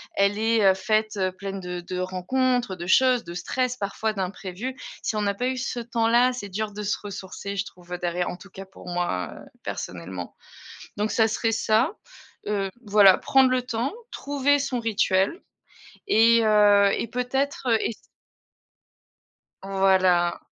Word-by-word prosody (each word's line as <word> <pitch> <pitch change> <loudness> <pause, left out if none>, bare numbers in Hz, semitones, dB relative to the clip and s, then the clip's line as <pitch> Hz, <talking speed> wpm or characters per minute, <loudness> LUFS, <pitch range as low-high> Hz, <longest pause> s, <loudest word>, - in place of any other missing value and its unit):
elle 200 +1 +2
est, 225 -1 +2
heu, 190 - +6
faite, 215 +3 0
heu 185 -1 0
pleine 195 +1 -6
de 180 -1 -5
de 180 +1 -5
rencontres, 235 +5 0
de 175 -1 -7
choses, 255 +3 +4
de 170 - -9
stress, 255 +6 -2
parfois 215 +2 -2
d'imprévus. 195 +5 -5 0.3
Si - - -1
on 210 - 0
n'a 200 -1 0
pas 245 - -2
eu 260 0 -2
ce 255 -2 -3
temps-là, 235 +1 +2
c'est 205 -5 -6
dur 210 +2 -3
de 210 - -6
se 205 - -1
ressourcer 200 0 -6
je 200 - -1
trouve, 180 -2 -12
heu, 180 - -4
derrière. 175 0 -1
En - - -8
tout 200 +1 -15
cas 195 0 -10
pour 190 -1 -15
moi, 175 - -2
heu, - - -12 0.2
personnellement 90 0 -6 0.6
donc 210 +1 -1
ça 225 -1 +3
serait 225 +1 0
ça. 225 - +2 0.5
Heu, 195 -2 -1 0.2
voilà 200 -2 +6
prendre 265 -1 +4
le 255 0 +2
temps, 245 +1 -2 0.2
trouver 285 0 +1
son 275 -3 -2
rituel 210 - +1 0.6
et 230 - +5
heu, 205 -2 +5
et - - -2
peut-être, 255 +4 -2
heu, 225 - +4
ess 225 - -2 1.7
Voila. 190 -3 +2
205 Hz, 165 wpm, -25 LUFS, 190-240 Hz, 1.7 s, heu